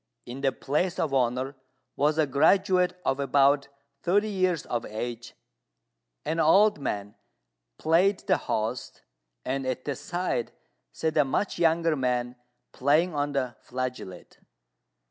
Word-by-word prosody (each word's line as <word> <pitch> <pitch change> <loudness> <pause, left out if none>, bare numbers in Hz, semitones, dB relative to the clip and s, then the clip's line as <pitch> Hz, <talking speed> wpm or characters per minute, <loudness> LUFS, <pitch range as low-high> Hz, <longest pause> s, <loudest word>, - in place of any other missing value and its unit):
In 125 +3 -8
the 135 -1 +2
place 150 +8 -1
of 145 - -1
honour 130 +1 0 0.4
was 150 +2 +1
a 155 - +4
graduate 180 +5 +3
of 135 - 0
about 140 0 +3 0.3
thirty 205 +5 +2
years 185 -5 0
of 120 -1 -2
age; 120 +2 -6 0.9
an 160 +1 -1
old 195 +4 +5
man 105 -6 -4 0.6
played 180 +5 +3
the - - +2
host, 110 +3 -3 0.4
and 135 +1 -2
at 130 0 -3
the 145 - -2
side 175 -6 -3 0.4
sat 160 -1 -2
a 150 - +6
much 170 +8 -2
younger 165 -1 +3
man 125 -2 -1 0.4
playing 155 +6 +2
on 145 0 -1
the 130 -4 -2
flageolet. 125 -8 -6
140 Hz, 130 wpm, -27 LUFS, 125-170 Hz, 0.9 s, a